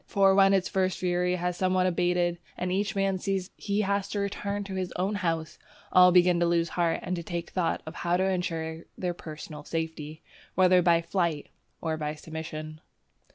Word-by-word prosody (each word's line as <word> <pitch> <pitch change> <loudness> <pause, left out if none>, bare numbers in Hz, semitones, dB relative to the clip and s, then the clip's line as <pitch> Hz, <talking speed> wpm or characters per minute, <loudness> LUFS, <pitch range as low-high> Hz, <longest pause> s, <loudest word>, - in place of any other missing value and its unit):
For 195 -1 +4
when 195 0 +6
its 190 -2 +2
first 185 -1 0
fury 180 0 +1
has 180 0 -2
somewhat 185 0 +2
abated, 175 -1 +1 0.2
and 180 0 -2
each 200 +3 0
man 195 -1 +1
sees 190 -1 -2
that - - -31
he 205 0 +1
has 200 -1 0
to 205 - -2
return 200 0 -2
to 195 -1 -7
his 185 -1 -3
own 190 +3 0
house, 165 -5 -2 0.3
all 180 0 +7
begin 180 -1 +5
to 170 - +3
lose 170 0 +1
heart 170 -2 0
and 180 - -2
to 170 - -4
take 170 0 -5
thought 170 -3 -1
how 175 0 +1
to 185 - +1
insure 165 -3 -2
their 180 -1 -2
personal 155 -2 -9
safety, 160 -1 -5 0.3
whether 185 0 +5
by 170 -1 +3
flight 170 -4 -1 0.3
or 160 -1 -1
by 150 0 -3
submission. 155 0 -7
180 Hz, 190 wpm, -28 LUFS, 165-190 Hz, 0.3 s, all